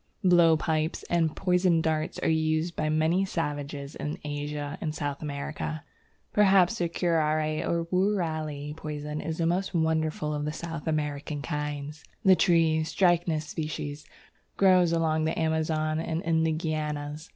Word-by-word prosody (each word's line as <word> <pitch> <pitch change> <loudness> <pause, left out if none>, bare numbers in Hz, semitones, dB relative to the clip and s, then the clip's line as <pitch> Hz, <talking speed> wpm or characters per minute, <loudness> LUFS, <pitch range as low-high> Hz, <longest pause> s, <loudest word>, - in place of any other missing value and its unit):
Blowpipes 160 -3 +3
and 165 -3 +2
poisoned 180 -3 +2
darts 155 0 -1
are - - +2
used 160 +1 +1
by 155 - -1
many 160 +4 +2
savages 145 -5 -4
in 150 +1 -4
Asia 145 0 -4
and 155 -1 -3
South 145 -2 -3
America. 150 +1 -4 0.5
Perhaps 195 0 +4
the 170 -1 0
Curare 155 -3 +1
or 170 0 0
Woorali 160 -7 -1
poison 150 -1 -5
is 160 0 -4
the 165 - 0
most 185 +3 0
wonderful 160 -2 0
of 150 0 -2
the 150 +1 -2
South 165 -1 -6
American 150 -1 -2
kinds. 150 -1 -4 0.2
The 190 -1 +8
tree, 165 -4 +3
Strychnos 165 -3 +1
sp., 155 -1 -5 0.5
grows 185 -3 +5
along 160 -1 +1
the 160 - -1
Amazon 160 -1 0
and 165 +1 -2
in 160 -1 +2
the 160 - +2
Guianas. 155 -1 -3
155 Hz, 140 wpm, -28 LUFS, 150-170 Hz, 0.5 s, The